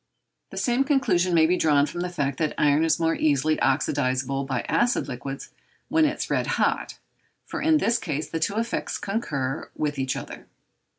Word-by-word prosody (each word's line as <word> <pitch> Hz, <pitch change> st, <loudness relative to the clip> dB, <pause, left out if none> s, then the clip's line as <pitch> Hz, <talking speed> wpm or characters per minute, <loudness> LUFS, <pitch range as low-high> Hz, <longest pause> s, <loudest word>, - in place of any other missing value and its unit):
The -, -, -10 dB
same 245 Hz, +2 st, +2 dB
conclusion 265 Hz, -, +2 dB
may 160 Hz, -1 st, +6 dB
be 175 Hz, +3 st, +3 dB
drawn 145 Hz, -4 st, +3 dB
from 175 Hz, +3 st, -5 dB
the 180 Hz, -, -2 dB
fact 140 Hz, -6 st, -2 dB
that 155 Hz, -2 st, 0 dB
iron 150 Hz, +1 st, +3 dB
is 165 Hz, -, +2 dB
more 165 Hz, 0 st, +2 dB
easily 155 Hz, +1 st, +1 dB
oxydizable 135 Hz, 0 st, 0 dB
by 135 Hz, -, -1 dB
acid 240 Hz, -7 st, +1 dB
liquids 135 Hz, +1 st, -6 dB, 0.4 s
when 320 Hz, 0 st, +4 dB
it 300 Hz, 0 st, 0 dB
is -, -, -3 dB
red -, -, +1 dB
hot, -, -, 0 dB, 0.5 s
for -, -, -5 dB
in 315 Hz, -1 st, +4 dB
this 235 Hz, -5 st, +1 dB
case 150 Hz, -3 st, -3 dB
the 165 Hz, -, -3 dB
two 200 Hz, +6 st, -1 dB
effects 230 Hz, +1 st, -2 dB
concur 150 Hz, -, -3 dB
with 145 Hz, -2 st, -2 dB
each 130 Hz, -1 st, -1 dB
other. -, -, -8 dB
155 Hz, 185 wpm, -25 LUFS, 140-200 Hz, 0.5 s, may